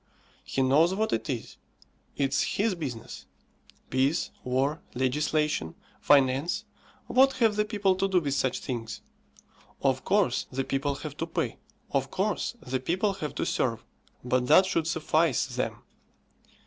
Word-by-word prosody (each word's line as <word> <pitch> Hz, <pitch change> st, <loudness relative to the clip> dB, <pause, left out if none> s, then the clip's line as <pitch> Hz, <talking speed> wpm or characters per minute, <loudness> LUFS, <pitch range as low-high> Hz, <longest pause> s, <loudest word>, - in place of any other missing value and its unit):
He 135 Hz, -, -1 dB
knows 155 Hz, +8 st, +4 dB
what 220 Hz, +2 st, 0 dB
it -, -, -2 dB
is. 125 Hz, -4 st, -4 dB, 0.6 s
It's 135 Hz, -1 st, +1 dB, 0.2 s
his 210 Hz, +1 st, +2 dB
business. 135 Hz, -10 st, -6 dB, 0.6 s
Peace, 135 Hz, +5 st, +1 dB
War, 135 Hz, +5 st, 0 dB
Legislation, 150 Hz, -, 0 dB, 0.2 s
Finance 145 Hz, +8 st, +3 dB, 0.4 s
what 270 Hz, +1 st, +4 dB
have 230 Hz, -5 st, +2 dB
the 210 Hz, 0 st, +1 dB
people 205 Hz, -3 st, +1 dB
to 195 Hz, +1 st, +1 dB
do 190 Hz, -2 st, +3 dB
with 145 Hz, -5 st, -2 dB
such 130 Hz, -2 st, 0 dB
things? 115 Hz, -3 st, -5 dB, 0.8 s
Of 130 Hz, -2 st, +1 dB
course 200 Hz, -1 st, +1 dB
the 135 Hz, +1 st, -1 dB
people 140 Hz, +1 st, -1 dB
have -, -, -7 dB
to -, -, -3 dB
pay; -, -, -2 dB, 0.3 s
of -, -, 0 dB
course -, -, -1 dB
the 130 Hz, +1 st, -1 dB
people 185 Hz, +9 st, 0 dB
have 150 Hz, -6 st, -5 dB
to -, -, -1 dB
serve; -, -, -1 dB, 0.4 s
but 125 Hz, 0 st, +1 dB
that 170 Hz, +6 st, +7 dB
should 165 Hz, -4 st, 0 dB
suffice 160 Hz, -3 st, +2 dB
them. -, -, -3 dB
150 Hz, 145 wpm, -28 LUFS, 130-190 Hz, 0.8 s, that